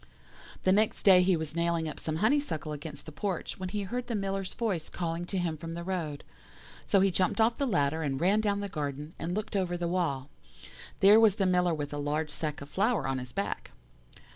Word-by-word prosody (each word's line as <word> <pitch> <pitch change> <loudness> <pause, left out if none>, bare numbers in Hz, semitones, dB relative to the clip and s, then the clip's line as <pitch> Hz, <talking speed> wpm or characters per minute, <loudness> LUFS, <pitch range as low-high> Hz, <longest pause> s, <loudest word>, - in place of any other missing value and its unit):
"The 185 - +4
next 210 +3 +2
day 185 -2 +8
he 180 -1 +3
was 160 0 -4
nailing 170 -1 0
up 155 - -6
some 155 - -3
honeysuckle 220 - +1
against 150 0 -7
the 155 - -8
porch, 180 +4 -3
when 185 -1 -3
he 205 +1 -2
heard 245 +6 -4
the 235 - -2
Miller's 195 -1 -2
voice 195 -9 -2
calling 170 0 -3
to 190 - -3
him 170 -3 -1
from 165 +1 -6
the 170 - -5
road. 170 -6 -3 0.6
So 195 - +4
he 195 0 +4
jumped 185 +5 +1
off 230 +3 +3
the 280 - +1
ladder, 160 - +1
and 135 -3 -1
ran 195 +6 +3
down 205 -1 0
the 200 - -2
garden, 150 -3 -4
and 175 +2 -2
looked 215 0 -3
over 180 -2 0
the 175 0 -2
wall. 160 -6 -1 0.7
"There 205 +3 +8
was 220 -3 +5
the 195 - +1
Miller 180 -2 +3
with 145 -1 -4
a 145 - -3
large 150 +1 -1
sack 150 0 -3
of 140 - -9
flour 200 - +1
on 135 -1 -1
his 125 -1 -8
back. - - -3
175 Hz, 220 wpm, -30 LUFS, 155-195 Hz, 0.7 s, day